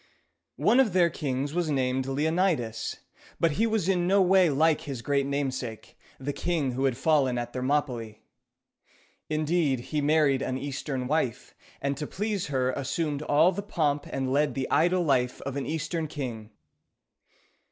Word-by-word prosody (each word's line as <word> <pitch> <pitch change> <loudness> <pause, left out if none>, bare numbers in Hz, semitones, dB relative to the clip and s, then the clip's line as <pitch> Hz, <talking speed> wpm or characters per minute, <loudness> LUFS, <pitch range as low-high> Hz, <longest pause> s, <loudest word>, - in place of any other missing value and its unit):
One 245 - +4
of 235 -8 +3
their 175 -2 +4
kings 140 -1 -3
was 175 -2 0
named 130 -2 0
Leonidas; 150 - 0 0.4
but 165 - +3
he 220 +10 +1
was 220 -5 0
in 180 -2 +2
no 195 +2 +4
way 185 -2 +5
like 155 +2 +2
his 135 -5 -6
great 140 0 +1
namesake, 130 -6 -3 0.2
the 140 +2 -3
king 160 -6 -1
who 130 +2 -1
had 130 -3 +1
fallen 135 -4 +2
at 120 0 -4
Thermopylæ. 125 -5 -1 1.1
Indeed, 155 -3 +1
he 150 - +1
married 145 -2 +3
an 130 - -2
Eastern 135 -1 -4
wife, 130 -4 -1 0.3
and 140 0 0
to 150 - -4
please 205 -2 -2
her 130 -3 0
assumed 145 +2 -2
all 155 +4 +4
the 195 +2 -4
pomp 150 -7 -1
and 135 -1 -2
led 150 +2 +1
the 135 -1 -2
idle 175 +2 +3
life 125 -5 +1
of 140 -1 -5
an 140 - -3
Eastern 160 +1 -2
king. 120 -8 -6
145 Hz, 160 wpm, -27 LUFS, 130-165 Hz, 1.1 s, way